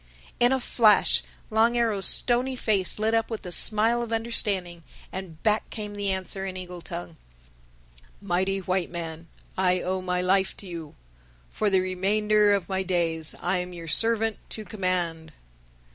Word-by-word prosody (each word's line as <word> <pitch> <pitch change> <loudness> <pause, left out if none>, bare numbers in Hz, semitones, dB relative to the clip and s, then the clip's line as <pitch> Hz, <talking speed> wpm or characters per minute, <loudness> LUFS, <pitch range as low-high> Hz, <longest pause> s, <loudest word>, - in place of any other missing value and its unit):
In 245 +1 +5
a 265 - +2
flash 225 -3 +4 0.3
Long 225 +2 +3
Arrow's 215 -5 +1
stony 250 +2 +4
face 205 -6 +1
lit 220 +1 0
up 225 0 +1
with 225 -4 -6
a 180 - -6
smile 225 +6 +3
of 235 -1 -5
understanding; 205 -7 -1 0.3
and 180 -4 -8
back 215 0 +1
came 210 -2 -6
the 205 -1 -2
answer 190 0 -2
in 190 -1 -5
eagle 180 -1 -8
tongue, 85 - -8 1.0
"Mighty 190 +2 -1
White 185 -1 -2
Man, 165 -1 -6 0.3
I 185 -1 +2
owe 185 +1 -2
my 180 -1 -1
life 190 +1 +1
to - - -7
you. 165 -4 -8 0.6
For 210 - 0
the 190 -1 +3
remainder 205 +3 +2
of 200 -4 +1
my 190 -1 -1
days 170 -4 -1
I 180 +2 +1
am 180 0 -4
your 170 -1 -9
servant 225 +5 +2
to 215 - -7
command." 175 -6 -2
190 Hz, 160 wpm, -26 LUFS, 180-215 Hz, 1.0 s, In